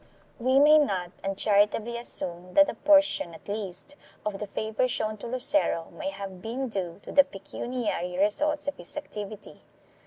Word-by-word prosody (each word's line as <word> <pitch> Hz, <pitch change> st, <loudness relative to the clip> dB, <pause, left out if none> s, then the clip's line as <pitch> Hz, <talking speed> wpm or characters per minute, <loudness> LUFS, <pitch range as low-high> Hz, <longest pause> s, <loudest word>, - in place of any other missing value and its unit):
2 -, -, -10 dB
We 260 Hz, +1 st, +4 dB
may 305 Hz, +2 st, +7 dB
not 185 Hz, -11 st, 0 dB
uncharitably 205 Hz, +3 st, +1 dB
assume 180 Hz, -6 st, -1 dB
that 295 Hz, 0 st, +7 dB
a -, -, -9 dB
portion, 290 Hz, -, +3 dB
at -, -, -16 dB
least, 205 Hz, +5 st, -4 dB, 0.3 s
of 205 Hz, -2 st, -3 dB
the 210 Hz, -, -4 dB
favor 220 Hz, +5 st, -1 dB
shown 215 Hz, -3 st, -2 dB
to 210 Hz, -, -8 dB
Lucero 250 Hz, -, +1 dB
may 170 Hz, -, -4 dB
have 195 Hz, -2 st, -8 dB
been 250 Hz, +5 st, -3 dB
due 185 Hz, -5 st, -4 dB
to -, -, -8 dB
the 280 Hz, -, +7 dB
pecuniary 195 Hz, -4 st, -4 dB
results 295 Hz, +10 st, +1 dB
of 285 Hz, -, -2 dB
his 175 Hz, +10 st, -8 dB
activity. 210 Hz, -7 st, -7 dB
210 Hz, 165 wpm, -27 LUFS, 195-255 Hz, 0.3 s, may